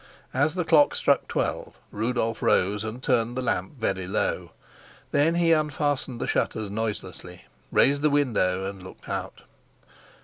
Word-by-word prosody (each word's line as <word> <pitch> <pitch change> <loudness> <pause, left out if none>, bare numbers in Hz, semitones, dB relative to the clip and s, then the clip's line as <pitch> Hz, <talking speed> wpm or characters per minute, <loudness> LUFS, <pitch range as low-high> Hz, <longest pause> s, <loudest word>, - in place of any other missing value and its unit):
As 145 +5 +1
the 180 -2 -1
clock 155 -3 +5
struck - - +2
twelve - - -3
Rudolf 115 +1 -1
rose 100 +3 +2
and 110 +4 -6
turned 120 -2 +1
the - - 0
lamp 95 -4 -1
very 95 -5 -2
low. 95 - -1 0.6
Then 150 +4 +3
he 170 -1 +3
unfastened 145 -5 0
the - - -2
shutters 110 -2 -1
noiselessly, 95 -4 -5 0.3
raised 140 +1 +4
the 150 - +3
window 105 -10 +1
and 100 -1 -6
looked 95 - -13
out. - - -5
120 Hz, 145 wpm, -26 LUFS, 100-145 Hz, 0.6 s, clock